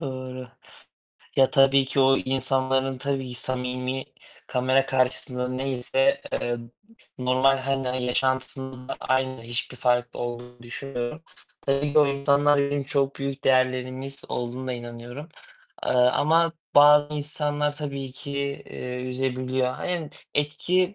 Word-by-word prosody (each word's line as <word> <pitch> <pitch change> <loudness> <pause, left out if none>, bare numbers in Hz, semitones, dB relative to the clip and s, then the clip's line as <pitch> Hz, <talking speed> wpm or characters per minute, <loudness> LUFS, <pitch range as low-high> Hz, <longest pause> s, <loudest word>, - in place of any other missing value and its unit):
Doğru. 130 -3 -6 0.9
Ya 135 -1 +5
tabii 135 -1 +5
ki 135 +1 0
o 135 0 +5
insanların, 130 0 0
tabii 135 -1 -2
ki 125 - -7
samimi, 125 +1 -2 0.4
kamera 130 +2 +2
karşısında 125 -1 0
neyse, 135 - +1
eee, 120 0 -1 0.6
normal 130 +2 +3
hani 130 -1 -1
yaşantısında 130 0 -1
da - - -5
aynı, 130 -2 0
hiçbir 120 +2 -3
farklı 125 0 +1
olduğunu 120 0 -6
düşünmüyorum. 125 +3 -5 0.4
Tabii 140 +1 0
ki 155 - +5
o 150 - +6
insanlar 140 +1 +3
bizim 140 0 0
çok 140 -1 0
büyük 140 0 -4
değerlerimiz 130 +1 +1
olduğuna 125 +2 -3
inanıyorum, 120 +4 -8 0.6
eee, - - +1
ama 155 +7 +4 0.2
bazı 145 +1 +7
insanlar 150 0 0
tabii 140 -3 -5
ki, 140 - -8 0.4
eee, 125 0 -5
üzebiliyor. 130 0 -1
Aynen, 175 -4 -3 0.2
etki 180 +6 +1
130 Hz, 120 wpm, -25 LUFS, 125-140 Hz, 0.9 s, bazı